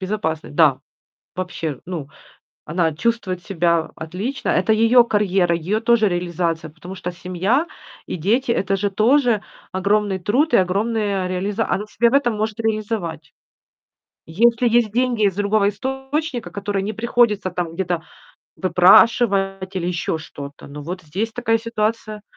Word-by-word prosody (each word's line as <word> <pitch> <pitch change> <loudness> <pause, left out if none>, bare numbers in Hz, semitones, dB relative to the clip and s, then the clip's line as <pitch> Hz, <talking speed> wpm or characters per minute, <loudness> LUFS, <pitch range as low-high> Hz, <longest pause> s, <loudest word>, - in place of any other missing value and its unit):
Безопасность, 185 -7 -3
да. 150 -6 +5 0.6
Вообще, 170 -5 -4
ну, 165 -6 -5 0.6
она 165 0 0
чувствует 185 -1 -2
себя 170 -4 0
отлично, 190 - -4
это 220 - +2
ее 230 +3 +5
карьера, 195 -6 +1
ее 195 +7 -1
тоже 230 -2 +3
реализация. 170 -3 -2
Потому 180 +3 -9
что 180 -1 -5
семья 185 - -1 0.4
и - - -2
дети- 235 +9 +1
это 195 -3 0
же 205 +1 0
тоже 230 +2 +3 0.3
огромный 200 +1 +1
труд 255 - +1
и - - +7
огромная 200 0 -1
реализа 195 +4 -1
Она 210 - -1
себя 235 +3 +2
в - - -5
этом 240 -5 -1
может 215 +1 -2
реализовать. 210 -8 -3 0.9
Если 235 +7 +3
есть 220 -4 +1
деньги 245 -2 +1
из 195 -2 +1
другого 205 0 +2
источника, 265 +4 -3
которые 200 -1 -2
не 215 - -3
приходится 225 -3 +1
там 175 -2 -4
где-то 175 -2 -2 0.6
выпрашивать 195 0 +4
или 175 - -2
еще 170 -2 -2
что-то. 145 -2 -10
Ну, 145 +1 -9
вот 180 +4 -6
здесь 195 +9 -3
такая 225 -1 +1
ситуация. 215 -1 -3
200 Hz, 140 wpm, -21 LUFS, 175-225 Hz, 0.9 s, и